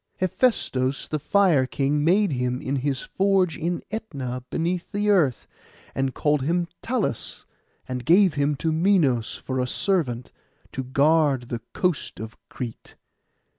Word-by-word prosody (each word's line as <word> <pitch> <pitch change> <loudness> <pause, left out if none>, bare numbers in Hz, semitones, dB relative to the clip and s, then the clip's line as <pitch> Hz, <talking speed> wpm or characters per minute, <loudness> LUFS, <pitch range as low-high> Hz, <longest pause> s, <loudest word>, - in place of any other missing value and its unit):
Hephaistos 140 - 0
the 155 - -1
Fire 160 -4 +3
King 145 +2 0
made 190 +4 +3
him 125 -1 -1
in 140 -1 -2
his 135 0 -1
forge 190 -3 +1
in 170 +1 -2
Ætna 135 - -4
beneath 175 +1 -2
the 205 0 +1
earth, 155 - +2 0.5
and 135 -1 -1
called 150 -1 +1
him 170 +5 0
Talus, 230 - -2 0.4
and 125 -1 -4
gave 180 +3 +5
him 145 0 +1
to 160 +4 -1
Minos 155 - +2
for 130 -1 -4
a 125 - 0
servant, 130 - 0 0.4
to 130 - -4
guard 140 -1 +2
the 120 -2 -4
coast 180 -5 -1
of 110 +1 -7
Crete. 120 -4 -7
150 Hz, 140 wpm, -24 LUFS, 130-180 Hz, 0.5 s, gave